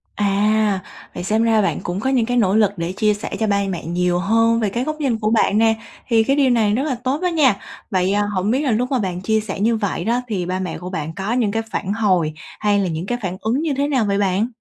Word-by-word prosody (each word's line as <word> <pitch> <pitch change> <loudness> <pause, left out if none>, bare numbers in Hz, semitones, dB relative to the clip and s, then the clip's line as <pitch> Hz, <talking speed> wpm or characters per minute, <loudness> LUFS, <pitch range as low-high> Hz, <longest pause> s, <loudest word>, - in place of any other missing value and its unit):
À! 205 0 +2 0.4
Vậy - - -4
xem 215 +4 +1
ra 225 -2 +3
bạn 200 - 0
cũng 175 +2 -3
có 265 - -1
những 255 -4 +2
cái 245 +1 -1
nỗ 200 -4 +3
lực 210 -2 +4
để 170 +1 -2
chia 210 +2 +2
sẻ 205 - -5
cho 220 - +1
bai 200 -1 +1
mẹ 175 -5 -4
nhiều 175 +1 0
hơn 225 +4 +2
về 215 -3 0
cái 235 +5 -2
góc 310 +3 -3
nhìn 250 -6 0
của 215 -1 0
bạn 215 -2 +3
nè. 225 0 +4 0.3
Thì 225 -2 +4
cái 270 +4 +1
điều 280 -2 +3
này 220 -4 +2
rất 255 +5 0
là 290 -4 -1
tốt 270 +4 -1
đó 365 - +1
nha! 300 - +3 0.4
Vậy, 185 -1 +1
à, 205 - +2
hổng 190 +3 0
biết 260 +4 +1
là 280 -4 0
lúc 245 +4 0
mà 260 - +2
bạn 180 -4 -3
chia 220 +3 +1
sẻ 205 -2 -5
như 225 +3 +2
vậy 205 -5 -2
đó 240 +3 +1
thì 195 -6 -2
ba 185 +1 -2
mẹ 180 -3 -4
của 180 +2 -7
bạn 160 -3 -4
có 200 +4 -2
những 235 -5 +1
cái 225 +2 -1
phản 195 +1 -2
hồi 185 -8 +1 0.3
hay 205 -1 +2
là 195 - 0
những 165 0 -3
cái 245 +4 -2
phản 185 -2 -3
ứng 235 +6 0
như 315 -3 0
thế 280 +1 0
nào 260 -6 +1
vậy 200 -1 0
bạn? 200 +2 +1
215 Hz, 285 wpm, -20 LUFS, 190-235 Hz, 0.4 s, lực